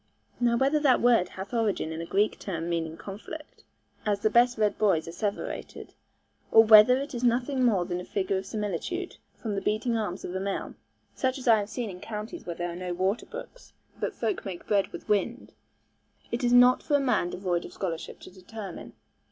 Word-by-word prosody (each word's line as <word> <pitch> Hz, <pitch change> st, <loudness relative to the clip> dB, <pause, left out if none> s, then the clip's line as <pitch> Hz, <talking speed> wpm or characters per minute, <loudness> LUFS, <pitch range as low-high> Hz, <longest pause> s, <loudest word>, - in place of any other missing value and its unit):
Now 235 Hz, -1 st, +3 dB
whether 275 Hz, +4 st, +3 dB
that 275 Hz, -4 st, +4 dB
word 235 Hz, -7 st, +4 dB
hath 190 Hz, +4 st, -8 dB
origin 215 Hz, -8 st, 0 dB
in 160 Hz, +1 st, -4 dB
a 165 Hz, -, -6 dB
Greek 205 Hz, +4 st, +1 dB
term 170 Hz, -4 st, -4 dB
meaning 165 Hz, -2 st, -2 dB
a -, -, -17 dB
conflict, 230 Hz, +10 st, -9 dB, 0.4 s
as 205 Hz, -1 st, 0 dB
the 215 Hz, -, +2 dB
best 245 Hz, +1 st, +4 dB
read 210 Hz, -1 st, +1 dB
boys 185 Hz, -7 st, +2 dB
asseverated, 200 Hz, +5 st, -5 dB, 0.6 s
or 225 Hz, -, +8 dB
whether 220 Hz, +3 st, +8 dB
it 280 Hz, +1 st, -5 dB
is 240 Hz, 0 st, -4 dB
nothing 250 Hz, +2 st, +1 dB
more 200 Hz, -8 st, +3 dB
than 175 Hz, 0 st, -3 dB
a -, -, -7 dB
figure 190 Hz, 0 st, -1 dB
of 190 Hz, -, -9 dB
similitude, 215 Hz, -, -3 dB, 0.2 s
from 220 Hz, -3 st, -4 dB
the 195 Hz, -, -2 dB
beating 215 Hz, +4 st, 0 dB
arms 205 Hz, -5 st, -3 dB
of 180 Hz, -, -5 dB
a 190 Hz, -, -2 dB
mill, 195 Hz, 0 st, -3 dB, 0.4 s
such 260 Hz, +1 st, -1 dB
as 260 Hz, -, -8 dB
I 225 Hz, -2 st, +6 dB
have 205 Hz, 0 st, -4 dB
seen 230 Hz, -2 st, -4 dB
in 180 Hz, -, -10 dB
counties 215 Hz, -, -7 dB
where 170 Hz, -1 st, -5 dB
are 175 Hz, -1 st, -3 dB
no 180 Hz, 0 st, -4 dB
waterbrooks, 240 Hz, -, -4 dB, 0.3 s
but -, -, -2 dB
folk 395 Hz, -, -2 dB
make 185 Hz, -4 st, -7 dB
bread 200 Hz, -2 st, +2 dB
with -, -, -10 dB
wind 210 Hz, +5 st, -1 dB, 0.8 s
it 235 Hz, +1 st, -2 dB
is 240 Hz, -, +2 dB
not 245 Hz, +1 st, +6 dB
for 290 Hz, -, +1 dB
a -, -, +4 dB
man 245 Hz, -10 st, +1 dB
devoid 180 Hz, -2 st, -2 dB
of -, -, -9 dB
scholarship 170 Hz, -4 st, -5 dB
to -, -, -11 dB
determine. 195 Hz, +1 st, -9 dB
210 Hz, 200 wpm, -27 LUFS, 185-245 Hz, 0.8 s, or